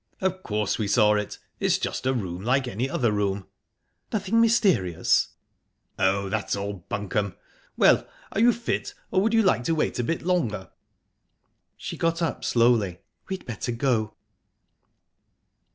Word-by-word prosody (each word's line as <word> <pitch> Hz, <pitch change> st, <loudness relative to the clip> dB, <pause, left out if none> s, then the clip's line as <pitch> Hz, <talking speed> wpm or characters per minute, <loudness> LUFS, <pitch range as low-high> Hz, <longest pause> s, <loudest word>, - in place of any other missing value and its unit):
"Of 190 Hz, 0 st, -1 dB
course 105 Hz, -, -1 dB
we 105 Hz, -, 0 dB
saw 105 Hz, 0 st, +4 dB
it. 105 Hz, -1 st, -2 dB, 0.2 s
It's -, -, +2 dB
just -, -, -3 dB
a 130 Hz, -, +3 dB
room 95 Hz, -5 st, -4 dB
like 130 Hz, +3 st, +2 dB
any 125 Hz, +3 st, -2 dB
other 120 Hz, -4 st, +1 dB
room." 100 Hz, -2 st, -1 dB, 0.7 s
"Nothing 215 Hz, +1 st, +2 dB
mysterious?" 190 Hz, -, +3 dB, 0.7 s
"Oh, 100 Hz, +1 st, +2 dB
that's 105 Hz, +1 st, -1 dB
all 100 Hz, -2 st, -5 dB
bunkum!...Well 100 Hz, -1 st, 0 dB, 0.2 s
are -, -, -2 dB
you 240 Hz, +1 st, +7 dB
fit, 235 Hz, 0 st, -3 dB, 0.2 s
or 190 Hz, -, +3 dB
would 225 Hz, +3 st, +2 dB
you 225 Hz, -, +5 dB
like 185 Hz, -10 st, +3 dB
to 165 Hz, -, +1 dB
wait 150 Hz, -, -1 dB
a -, -, +1 dB
bit 165 Hz, +7 st, -2 dB
longer?" 135 Hz, -, -1 dB, 1.1 s
She -, -, -6 dB
got 165 Hz, 0 st, 0 dB
up 165 Hz, -2 st, -2 dB
slowly. 115 Hz, -7 st, +2 dB, 0.3 s
"We'd 190 Hz, -1 st, -4 dB
better 120 Hz, 0 st, -4 dB
go." 115 Hz, -3 st, 0 dB
120 Hz, 145 wpm, -25 LUFS, -, 1.1 s, you